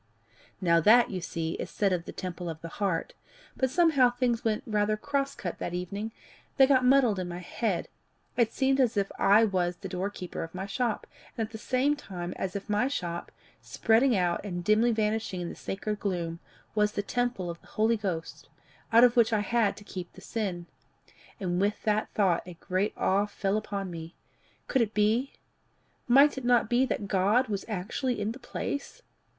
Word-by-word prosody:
"Now 170 -3 +4
that, 235 +8 +6
you 185 -2 -3
see, 165 -2 -3
is - - -4
said 200 -2 +1
of 175 -1 -2
the - - -6
temple 180 -1 -5
of 160 -1 -6
the 165 - -6
heart; 185 -5 0 0.4
but 260 - +1
somehow 300 -5 +4
things 245 -1 0
went 215 -2 0
rather 215 -1 +1
cross 275 +5 -1
cut 175 - -5
that 175 - -3
evening 200 +5 -4 0.5
they 270 - +8
got 265 -2 +4
muddled 250 -6 +4
in 180 - -3
my 175 0 -5
head. 185 +2 -2 0.5
It 230 -2 +2
seemed 270 +2 +1
as 240 -5 +2
if 195 -1 0
I 210 +3 +6
was 180 -4 0
the 195 - -8
door 185 +1 -2
keeper 185 -3 -6
of 165 +2 -9
my 190 +1 -3
shop, 230 +2 -1 0.3
and 225 - 0
at - - -24
the 220 - -7
same 265 +5 +1
time 180 -9 -6
as 190 0 -3
if 200 - -5
my 210 +4 +2
shop, 175 -11 -4 0.3
spreading 225 - +2
out 175 -2 0
and 175 -4 -4
dimly 215 +5 +4
vanishing 215 -3 -1
in 170 - -4
the - - -7
sacred 210 +2 -4
gloom, 170 -4 -2 0.3
was 210 -1 +2
the 205 - -2
temple 240 -6 -1
of 170 - -11
the - - -20
Holy 220 +2 +2
Ghost, 185 -7 -5 0.4
out 230 +1 +7
of 245 -1 +6
which 235 -1 +4
I 215 -2 +2
had 220 0 +1
to 205 - -11
keep 180 -3 -7
the - - -13
sin. 190 -7 -3 0.7
And 180 -1 -1
with 205 +1 0
the 215 0 +1
thought, 185 -5 +3
a 180 - -8
great 185 +4 -1
awe 200 +2 +2
fell 200 -1 -1
upon 200 -3 -3
me: 165 0 -8 0.5
could 265 - +2
it 220 -2 -1
be 220 +6 +2 0.7
might 275 +3 +6
it - - -11
not 240 -2 +3
be 250 +2 +3
that 205 - -2
God 205 +7 +2
was 200 -2 -3
actually 225 +5 -2
in 210 +1 -1
the 250 - -9
place? 285 - -5
210 Hz, 200 wpm, -28 LUFS, 180-235 Hz, 0.7 s, they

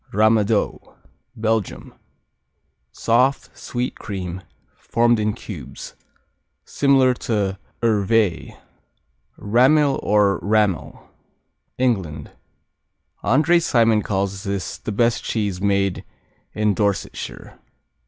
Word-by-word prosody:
Ramadoux 110 0 +2 0.6
Belgium 110 -2 -2 1.0
Soft; 130 +4 +1
sweet 125 +1 -4
cream; 95 -3 -5 0.3
formed 120 -1 +1
in 105 0 0
cubes. 95 - -9 0.7
Similar 135 -2 +3 0.2
to 100 -4 0 0.2
Hervé 110 -3 +1 0.8
Rammil 135 +6 +3
or 105 -1 +2
Rammel 105 -5 -1 0.7
England 95 - -1 0.9
André 155 +10 +3
Simon 115 -7 +3
calls 95 -1 -2
this 100 -3 -4
"the - - -5
best 115 +3 +1
cheese 100 -5 -2
made 100 -2 0 0.5
in 105 -1 +1
Dorsetshire." 100 -2 -3
105 Hz, 85 wpm, -21 LUFS, 100-120 Hz, 1.0 s, Similar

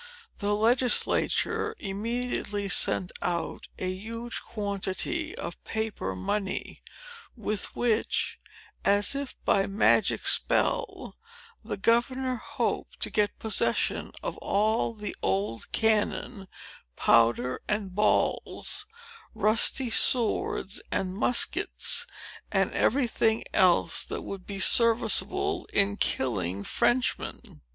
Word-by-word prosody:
The 205 0 0
legislature 245 - +1
immediately 210 0 -3
sent 180 0 +2
out 175 -1 -3
a 185 - -3
huge 230 +4 -6
quantity 205 - -3
of 170 - -6
paper 220 - -3
money, 190 - -3 0.6
with 215 -2 -3
which, 230 -2 0 0.4
as 205 +4 +2
if 280 -1 -5
by 195 -1 +2
magic 200 +2 +2
spell, - - +1 0.5
the - - -5
governor 255 +4 +1
hoped - - -3
to - - -2
get 210 -1 0
possession 220 -1 0
of - - -4
all 220 +3 0
the 210 -1 -6
old 100 +4 -2
cannon, 215 -1 0 0.5
powder 120 +2 +2
and 210 -3 -2
balls, 215 - 0 0.5
rusty 220 +4 +2
swords 225 -4 +2
and 185 -1 -1
muskets, 235 +5 +1 0.4
and - - +1
every 265 +2 +2
thing 225 -1 +1
else 185 -4 +3
that - - -5
would 195 -2 -8
be 200 -1 -5
serviceable 245 - +4
in 200 0 +2
killing 100 - -1
Frenchmen. 245 - -1
210 Hz, 100 wpm, -27 LUFS, 190-235 Hz, 0.6 s, serviceable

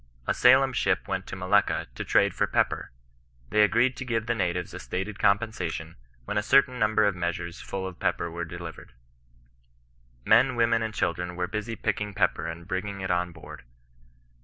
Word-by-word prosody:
A - - +1
Salem 130 +1 +5
ship 95 -6 0
went 95 -1 -3
to - - -6
Malacca 95 +2 +1
to - - -5
trade - - +3
for - - 0
pepper. - - 0 0.6
They 105 - +4
agreed 120 +5 +3
to - - -4
give 115 -3 -1
the 120 - 0
natives 90 -5 -2
a - - -6
stated 95 - -4
compensation, 95 -6 0 0.3
when 105 - 0
a - - 0
certain 130 +3 +3
number 110 -1 +3
of 100 -2 +1
measures 85 0 -4
full 95 -1 -5
of 95 -2 -7
pepper 85 -1 -1
were 85 +1 -4
de 85 +1 -7
livered. 85 -3 -9 0.7
" - - -36
Men, 130 -2 +5
women, 115 -1 +2
and 110 -1 -2
children 90 +1 -2
were 90 0 -1
busy 105 +4 -4
picking 105 -2 -2
pepper 90 -5 +1
and 85 +1 -7
bringing 100 +1 -3
it 95 - -2
on 90 0 0
board. 80 -1 -11
95 Hz, 185 wpm, -27 LUFS, 85-110 Hz, 0.7 s, Salem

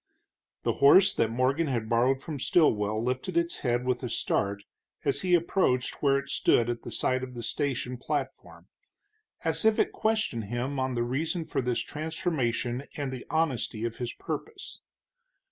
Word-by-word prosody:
The - - +1
horse 180 +8 +7
that 115 - +1
Morgan 130 +7 +1
had 120 -5 -1
borrowed 125 +4 +2
from 150 -4 -5
Stilwell 110 -9 +2
lifted 130 +9 -2
its 170 0 0
head 120 -1 0
with 125 -1 0
a 125 - -3
start 100 -2 -1 0.4
as 140 - +1
he 180 -1 +4
approached 165 -7 +1
where 140 -1 +4
it 140 0 -5
stood 120 -3 +3
at 120 - -5
the - - -8
side 130 0 0
of 130 -1 -7
the 120 - -6
station 125 0 -2
platform, - - -5 0.8
as - - 0
if 220 -1 +4
it - - +2
questioned 215 - 0
him 125 +6 -3
on 130 -1 -1
the 120 - +1
reason 155 +7 -2
for - - -1
this 125 -1 0
transformation 150 -7 -2 0.2
and 140 -3 -2
the 130 -2 -7
honesty 135 -8 0
of 115 -1 -4
his 120 -1 -3
purpose. 435 -3 -7
130 Hz, 170 wpm, -28 LUFS, 120-155 Hz, 0.8 s, horse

